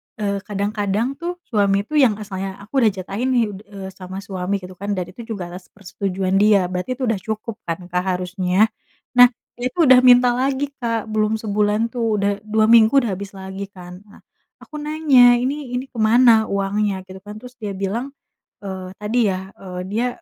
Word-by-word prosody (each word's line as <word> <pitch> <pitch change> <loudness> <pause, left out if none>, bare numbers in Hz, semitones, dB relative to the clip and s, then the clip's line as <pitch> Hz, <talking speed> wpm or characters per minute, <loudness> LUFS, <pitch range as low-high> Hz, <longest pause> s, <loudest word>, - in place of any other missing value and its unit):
eee, 200 -2 -2
kadang-kadang 205 +5 -1
tuh 345 +1 -3
suami 200 -3 +2
itu 300 +9 -3
yang 240 -7 +4
asalnya 195 -2 -6
aku 270 +7 -1
udah 220 - +6
jatahin 195 +6 -3
nih 240 -2 +3
d 195 - -9
eee 195 -2 -8
sama 185 0 -9
suami 190 0 -3
gitu 180 +1 -9
kan, 200 +1 -2
dan 180 -2 -2
itu 235 - -10
juga 175 -3 -6
atas 180 +1 -10
persetujuan 190 -1 -3
dia, 200 -3 +4
berarti 185 +8 -3
itu 255 - -6
udah 215 - 0
cukup 220 +3 -5
kan, 165 +1 -2
Kak, 180 0 0
harusnya. 185 +3 +1 0.5
Nah, 245 0 +10 0.3
dia 245 - -4
itu - - -9
udah 255 -1 +9
minta 250 0 +7
lagi, 270 +3 -1
Kak, 230 -3 -2
belum 215 0 +1
sebulan 210 +1 0
tuh, 230 -3 0
udah 200 0 +2
2 215 0 +2
minggu, 230 +2 +6
udah 235 - -2
habis 200 +1 -8
lagi 190 +1 -6
kan. 180 -1 -11
Nah, 205 - -18 0.4
aku 305 - -10
nanya, 290 -5 +5
"Ini 265 +1 -3
ini 250 +1 -2
ke - - -14
mana 225 0 +5
uangnya?" 200 0 -1
gitu 190 0 -11
kan. 210 0 -8
Terus 250 0 -11
dia 210 -4 -5
bilang, 225 +8 -3 0.5
eee, 190 -2 -6
tadi 215 +4 0
ya, 190 0 -4
eee, 180 -2 -7
dia 230 +5 0
210 Hz, 195 wpm, -21 LUFS, 190-240 Hz, 0.5 s, Nah